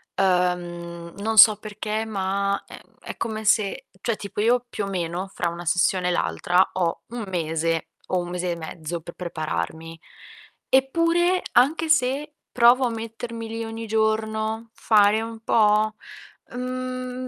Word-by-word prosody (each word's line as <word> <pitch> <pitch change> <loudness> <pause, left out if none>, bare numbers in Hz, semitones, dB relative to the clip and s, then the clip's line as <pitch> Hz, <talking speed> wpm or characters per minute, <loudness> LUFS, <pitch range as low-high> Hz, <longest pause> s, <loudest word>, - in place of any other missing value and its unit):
Uhm, 175 -2 -1
non 220 +2 -2
so 210 -1 +9
perché 215 +1 -4
ma, 200 -1 -1
ehm, - - -11 0.2
è - - -8
come 220 -1 -3
se 210 -1 +1
cioè, 230 +2 -1
tipo 205 0 -7
io, 240 +3 +2
più 205 - -3
o - - -5
meno, 180 0 -3
fra 170 - -1
una 170 +1 -7
sessione 180 +2 +2
e 180 - +2
l'altra 175 - +2
ho 175 -3 -1
1 235 -2 -6
mese, 165 -2 -1 0.2
o 185 - 0
1 175 0 -4
mese 180 0 -2
e - - -2
mezzo, 165 0 -6
pe 170 - -9
prepararmi. 160 - -4 0.7
Eppure, 335 +7 +3
anche 295 +7 +3
se 295 +1 +1 0.2
provo 250 +2 +5
a - - +1
mettermi 230 0 -6
lì 225 0 -4
ogni 225 0 -6
giorno, 220 +1 -1
fare 215 -1 +4
un 225 0 -6
po', 215 -1 +3 0.6
mhmm, 255 0 -4
215 Hz, 150 wpm, -24 LUFS, 175-230 Hz, 0.7 s, so